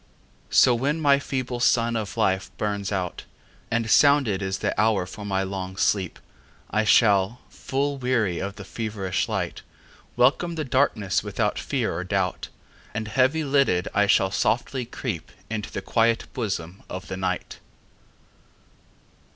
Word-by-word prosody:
So 125 - +6
when 140 +7 0
my 140 -3 +4
feeble 130 -3 -3
sun 115 -1 +3
of 110 0 -4
life 95 -4 +1
burns 100 -1 -2
out, 95 -3 -3 0.4
And 115 -1 0
sounded 140 -9 +4
is 95 0 -2
the - - -1
hour 110 -4 +2
for 105 +3 -9
my 95 -1 0
long 95 -1 -5
sleep,I 95 - -2
shall, 105 0 +4
full 140 +1 -2
weary 120 -8 0
of 100 +1 -4
the 100 - -9
feverish 100 -3 -3
light, - - -3 0.5
Welcome 165 +7 +2
the 155 -2 -3
darkness 115 -7 +1
without - - -1
fear - - -1
or 90 - -3
doubt, 95 -1 -1 0.5
And 110 -1 -3
heavy 130 +7 +2
lidded, 140 -11 +2
I 105 0 +3
shall 95 -1 +3
softly 125 +4 0
creepInto 110 - -5
the 100 - -5
quiet 115 -1 +2
bosom 95 -6 -4
of 95 0 -6
the 95 - -5
Night. 90 -1 -3
110 Hz, 140 wpm, -25 LUFS, 95-125 Hz, 0.5 s, So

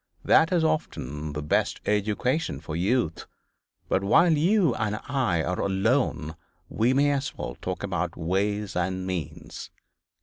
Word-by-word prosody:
That 160 +2 +5
is 175 -3 +2
often 75 - -2
the 75 0 -4
best 75 - 0
education 105 - 0
for 75 +1 -6
youth. 95 -1 0 0.6
But 95 - +1
while 165 - +5
you 165 - +3
and 105 -2 -2
I 125 - +1
are 90 +2 -2
alone 95 - 0 0.3
we 115 +3 +2
may 140 +2 +3
as 140 -1 -2
well - - -4
talk 90 +1 -4
about 90 -3 -2
ways 100 +4 -1
and 95 +1 -1
means. 90 -5 -5
100 Hz, 140 wpm, -26 LUFS, 90-135 Hz, 0.6 s, That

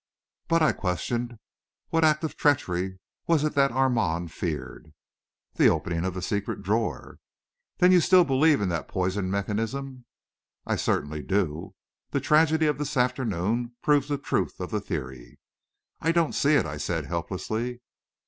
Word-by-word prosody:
"But," 165 -1 +3
I 155 - +5
questioned, 120 +6 -3 0.5
"what 165 0 +1
act 155 0 +3
of 160 - -3
treachery 95 -10 0 0.3
was 165 -3 +3
it 155 - 0
that 140 -1 +3
Armand 110 -11 0
feared?" 75 -1 -5 0.6
"The - - +4
opening 85 0 0
of 95 -1 -3
the 90 - -4
secret 100 +1 -3
drawer." 110 +4 -2 0.6
"Then 180 +1 +5
you 180 - +7
still 180 +2 +6
believe 145 -1 +3
in 100 - 0
the 85 -3 -1
poisoned 95 +5 -2
mechanism?" 115 +6 -3 0.6
"I - - 0
certainly 75 +1 -1
do. 85 -4 -2 0.3
The - - 0
tragedy 160 +1 +3
of 150 -2 0
this 150 -1 -3
afternoon 120 -2 0
proves 145 -2 +3
the 145 - 0
truth 140 - -2
of - - -5
the - - -1
theory." 65 -2 -6 0.6
"I 165 - +1
don't 165 -2 +1
see 145 +2 +3
it," - - +3
I 75 - -5
said, 80 +1 -2
helplessly. 110 - -3
115 Hz, 155 wpm, -26 LUFS, 90-145 Hz, 0.6 s, you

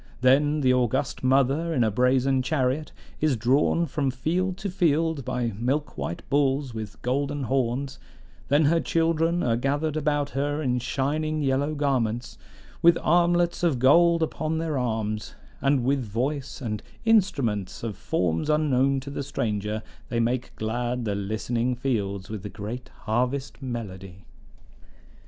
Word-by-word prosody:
Then 145 +4 +4
the 130 -2 +4
august 125 +1 0
Mother, 135 +5 +2
in 125 - +3
a 110 - +2
brazen 130 +3 +2
chariot, 135 +1 0 0.3
is 155 -3 +2
drawn 135 +8 +2
from 140 -2 -1
field 175 +8 -1
to 200 -1 -4
field 160 -4 +1
by 125 -3 -2
milk 135 +7 -1
white 85 - -5
bulls 135 -2 +1
with 110 -2 -7
golden 140 +3 -1
horns; 130 +1 -1 0.5
then 145 +2 +4
her 165 +3 +4
children 165 +1 +1
are 115 -2 +2
gathered 145 +5 -1
about 145 -2 0
her 145 +2 -1
in 125 -4 0
shining 150 +4 -1
yellow 140 +3 +1
garments, 120 -5 -1 0.4
with 170 0 +6
armlets 175 +1 +3
of 165 -7 +2
gold 165 +6 +5
upon 160 0 -2
their 160 -2 -2
arms; 110 -4 -2 0.3
and 140 -2 +2
with 135 +2 +1
voice 130 +7 -3
and 105 -4 -3 0.2
instruments 120 - +1
of 110 -4 -3
forms 85 - -1
unknown 140 -3 +2
to 140 +2 -8
the 140 - -4
stranger, 110 -5 -2 0.3
they 120 - -1
make 120 +2 -1
glad 120 +2 -2
the 105 - 0
listening 115 +5 -1
fields 100 -7 -2
with 110 -2 -6
the 105 - -6
great 110 +6 -7 0.2
harvest 125 +5 -1
melody. 95 -7 -6
135 Hz, 145 wpm, -26 LUFS, 120-150 Hz, 0.5 s, with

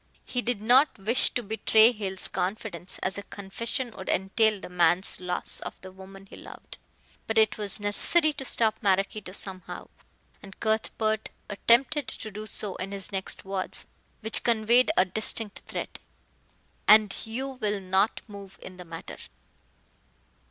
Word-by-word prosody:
He 250 - -2
did 240 -4 -2
not 260 +6 +5
wish 220 +6 +2
to 245 - -1
betray 220 +1 +5
Hale's 195 -5 -2
confidence, 185 -1 -4
as 190 +2 -1
a 200 - -11
confession 230 +5 -4
would 190 - -8
entail 205 +3 +2
the - - -8
man's 175 +1 +3
loss 180 -1 0
of - - -8
the 185 - -10
woman 195 +1 -13
he - - -13
loved. - - -12 0.5
But 225 - -1
it 220 -1 +3
was 205 0 0
necessary 305 +10 +1
to 270 - -6
stop 220 -3 +1
Maraquito 195 -1 0
somehow; 185 -1 -5 0.5
and 195 -1 -13
Cuthbert 220 0 -1 0.2
attempted 245 +7 +2
to 215 - -6
do 215 +2 -7
so 210 -2 -4
in 190 +2 -5
his 195 -3 -3
next 190 -1 -4
words, 190 -1 -1 0.3
which 220 0 +2
conveyed 235 +2 +4
a 185 - +6
distinct 210 +2 0
threat. - - -6 0.9
"And 215 -2 +6
you 245 +5 -4
will 210 -1 0
not 190 +3 +1
move 200 -2 -11
in 185 - -10
the 180 - -10
matter." 165 -1 -9
205 Hz, 150 wpm, -27 LUFS, 190-225 Hz, 0.9 s, a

